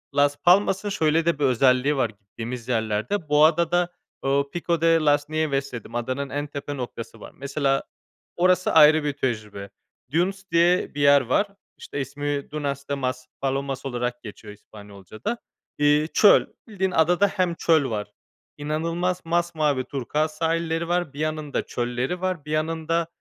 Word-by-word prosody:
Las 145 0 +3
Palmas'ın 195 +2 +3
şöyle 160 -3 +1
de 170 -3 +1
bir - - 0
özelliği 130 +2 +3
var 120 -4 +1
gittiğimiz 115 +4 -8
yerlerde, 115 - -1
bu 150 +1 +6
adada, 170 +2 +2 0.3
ooo, 140 +1 +1
"Pico 170 -1 -1
de 165 - +3
las 145 -1 +2
Nieves" 140 -4 -1
dedim. 120 0 -8
Adanın 130 +4 -2
en 145 +2 -3
tepe 145 0 -6
noktası 115 -3 -7
var. - - -11
Mesela 140 0 0 0.5
orası 185 +1 +2
ayrı 155 0 +7
bir 145 -1 -1
tecrübe. 105 -7 -4 0.4
Dunes 185 +5 0
diye 170 -1 +2
bir 145 - -2
yer 140 0 +6
var. 130 - +1 0.3
İşte, 145 - -5
ismi, 145 +1 -4
"Dunas 140 -2 -4
de - - 0
Maspalomas" 135 +1 -3
olarak 125 -1 -3
geçiyor 105 -1 -10
İspanyolcada. 105 - -8 0.4
İii, 145 +1 +3
çöl. 210 - +6 0.2
Bildiğin 190 -3 -2
adada 180 +4 +3
hem 185 -3 -1
çöl 160 -5 +2
var, 105 -2 -4 0.5
inanılmaz 165 +5 -2
masmavi 165 -5 0
turkuaz 150 +4 -2
sahilleri 165 0 -1
var. 175 -4 -1
Bir 145 - -10
yanında 155 -1 -2
çölleri 125 +8 -3
var, 185 -5 -2
bir 150 - -7
yanında, 160 +1 -1
145 Hz, 150 wpm, -24 LUFS, 130-165 Hz, 0.5 s, ayrı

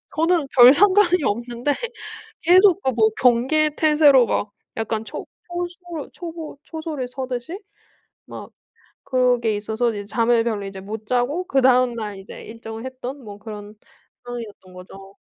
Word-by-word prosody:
저는 325 -2 +2
별 250 +1 +8
상관이 370 -2 +4
없는데 240 +5 -1 0.7
계속 370 +2 +5
그 265 - +1
뭐 220 -3 +3
경계 260 +6 +3
태세로 300 -5 +5
막 205 0 -1 0.3
약간 225 0 -2
초 - - -7 0.2
초소 350 -3 -6
초보 330 -4 -8
초소를 315 -6 -5
서 260 0 -5
듯이 255 +10 -5 0.7
막 - - -10 0.6
그런 250 -2 +2
게 220 -3 0
있어서 220 +3 -1
이제 205 -2 -5
잠을 230 +1 +1
별로 215 -4 -2
이제 195 -1 -7
못 215 +2 -7
자고 250 +9 0
그다음 255 -4 +3
날 210 -4 -5
이제 195 - -11
일정을 225 +1 -9
했던 260 +1 -7
뭐 205 -1 -10
그런 210 -1 -9 0.5
상황이었던 225 -6 -9
거죠. 195 +2 -13
245 Hz, 280 characters per minute, -22 LUFS, 220-310 Hz, 0.7 s, 별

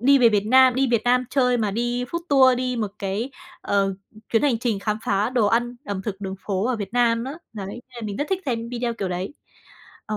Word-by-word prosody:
đi 275 +4 +5
về 240 -3 +6
Việt 210 -1 +1
Nam, 260 +1 +6
đi 270 +1 +2
Việt 230 -3 +2
Nam 250 +1 +3
chơi 250 -3 +3
mà 215 -3 0
đi 240 +3 -1
food 335 +7 -4
tour, 260 -3 +6
đi 250 -1 -1
một 215 -3 -2
cái, 200 +6 -2 0.3
ờ, 195 -1 +1 0.4
chuyến 225 - +3
hành 270 -6 +2
trình 230 -3 -1
khám 210 +2 -2
phá 200 +4 +1
đồ 240 -5 +2
ăn 240 +3 +1
ẩm 200 -6 -4
thực 200 -1 -5
đường 190 -1 -4
phố 195 -1 0
ở 255 -1 0
Việt 205 -1 -6
Nam 235 -1 +2
á. 275 +3 -5 0.2
Đấy, 205 -3 -6
nên 240 +5 -8
là 240 - -7
mình 205 -2 -4
rất 290 - -2
thích 380 0 0
xem 230 -2 -2
video 240 -1 -2
kiểu 200 -4 -3
đấy. 180 +8 -4 0.7
Ừ. 215 - -2
235 Hz, 250 wpm, -23 LUFS, 205-250 Hz, 0.7 s, về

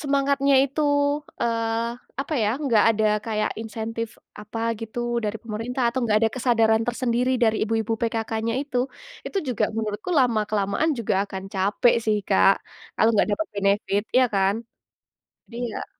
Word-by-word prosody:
semangatnya 280 -2 +2
itu, 280 +3 -3 0.6
eee, 230 0 0 0.3
apa 295 +3 -3
ya, 210 - +2 0.2
nggak 230 -6 +4
ada 220 -1 0 0.2
kayak 215 -2 -1
insentif 225 +1 -4 0.3
apa 210 +2 -6 0.2
gitu 225 +1 -6 0.3
dari 210 +1 -2
pemerintah, 230 +3 -4
atau 250 - -3
nggak 215 -2 +3
ada 225 - +3
kesadaran 225 -3 +3
tersendiri 240 +1 0
dari 220 -1 +3
ibu-ibu 225 0 -1
PKK-nya 225 0 -1
itu, 280 -3 -3 0.5
itu 395 - -2
juga, 245 - +1
menurutku 215 - -3
lama-kelamaan 215 +2 +1
juga 220 -2 0
akan 190 -1 -7
capek 200 +5 +2
sih, 215 -1 +2
Kak, 195 0 +6 0.5
kalau 220 - +5
nggak 210 - +3
dapat 320 - -1
benefit, 200 0 +1
iya, 255 - +6
kan? 195 0 +3 1.0
Iya. 235 -1 -4
225 Hz, 145 wpm, -24 LUFS, 210-245 Hz, 1.0 s, Kak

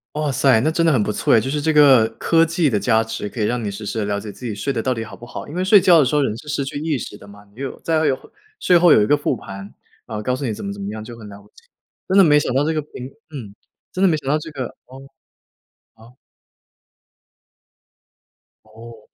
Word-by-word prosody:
哇 150 -2 -1
塞， 130 -2 +3
那 155 - +1
真 165 +1 0
的 165 - +4
很 130 -7 +2
不 105 - -2
错 - - +2
哎， 115 - +5
就 130 +5 -3
是 150 0 -1
这 160 +1 +1
个 135 -7 +6
科 165 0 +3
技 165 0 +1
的 115 -7 +1
加 110 +2 +2
持， 110 -2 -5
可 115 - -9
以 105 - +1
让 120 +2 -2
你 105 - -2
实 100 +2 -7
时 110 - -3
地 105 - -1
了 100 0 -2
解 105 0 -8
自 125 - -16
己 110 -4 -4
睡 135 +7 -3
得 115 - -2
到 130 - -1
底 115 -3 -2
好 110 - -10
不 - - -17
好。 120 - -8
因 150 - -10
为 180 - -2
睡 200 +2 +6
觉 175 -3 +5
的 140 - +4
时 150 - -1
候 145 - +3
人 110 -5 -1
是 130 +6 -12
失 145 -2 -2
去 140 - -5
意 155 -1 -1
识 - - -7
的 100 - -14
嘛， 100 0 -15
你 130 - -11
有 135 - -6
再 160 -1 0
会 155 - +1
有 135 -2 +1 0.4
睡 180 - +3
后 175 -1 +6
有 105 - +6
一 - - +2
个 145 - +3
复 145 -2 -1
盘， 95 -1 -9 0.5
然 110 - -5
后 105 - -5
告 125 +3 0
诉 135 - -6
你 120 - -1
怎 105 - -8
么 100 - -4
怎 100 - -9
么 100 - -4
样， 110 0 -7
就 115 +1 -10
很 110 -2 -11
了 100 0 -11
不 - - -21
起。 455 - -22 0.4
真 190 - +2
的 195 - +8
没 150 -3 +5
想 - - -2
到 140 - +3
这 160 - 0
个 155 - -1
苹 130 -3 -9 0.2
嗯， 125 -10 -9 0.4
真 185 - -4
的 195 - +5
没 160 -3 +2
想 140 -3 -10
到 145 - +2
这 160 +1 -9
个 135 -4 -4 0.2
哦。 130 +1 -12 0.9
好。 115 +2 -18 2.5
哦。 115 +1 -13
130 Hz, 305 characters per minute, -20 LUFS, 110-150 Hz, 2.5 s, 的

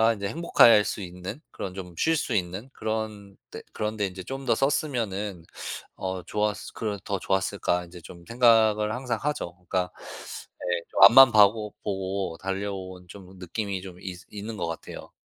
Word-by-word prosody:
이제 100 -1 -3
'행복할 115 - +5
수 105 - -3
있는 90 +8 -7
그런 95 - -6
좀 90 -3 -7
쉴 165 - +2
수 - - -2
있는 95 +6 -2
그런 110 -2 -4 0.2
데, - - -7
그런 110 0 -3
데 105 - +1
이제 95 0 -8
좀 135 +4 -6
더 125 - +3
썼으면은 105 - -1 0.5
어 95 -1 -4
좋았을 105 0 -2
그런 105 -2 -2
더 100 -2 -2
좋았을까?' 95 -2 0
이제 85 +1 -12
좀 85 +1 -12
생각을 110 -3 +4
항상 125 -3 -2
하죠. 140 -12 -2
그니까 90 0 -2 0.7
에 90 -1 0
좀 - - +4
앞만 120 +5 +10
봐 105 -2 +9
보고 100 -4 -4
달려온 95 -2 -4
좀 95 0 -12
느낌이 95 +1 -3
좀 90 -2 -10
있으 90 -1 -7
있는 105 +2 -6
거 85 - -2
같아요. 85 - -7
100 Hz, 300 characters per minute, -26 LUFS, 95-110 Hz, 0.7 s, 앞만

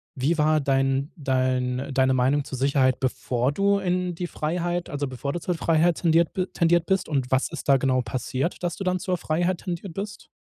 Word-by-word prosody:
wie 145 +6 0
war 155 0 +3
dein 135 +1 +1
dein 130 -2 -1
deine 130 0 +3
Meinung 135 +3 +2
zur 135 -2 -6
Sicherheit, 135 -2 +2
bevor 130 0 0
du 200 +5 +2
in 180 -1 -1
die 175 +1 -4
Freiheit 175 +3 -2
also 145 -1 -2
bevor 130 +2 -4
du 175 - -3
zur 180 +1 -2
Freiheit 165 +1 +2
tendiert 165 -1 +3
bi 185 -3 0
tendiert 170 0 +2
bist, 190 -1 0
und 135 -3 -1
was 130 0 +2
ist - - -7
da 135 - +7
genau 130 -1 +1
passiert, 130 +7 -3
dass 175 -1 -1
du 195 - -5
dann 185 0 0
zur 180 0 -1
Freiheit 175 +3 -1
tendiert 175 -1 -5
bist? 205 +2 -6
155 Hz, 200 wpm, -25 LUFS, 130-175 Hz, -, da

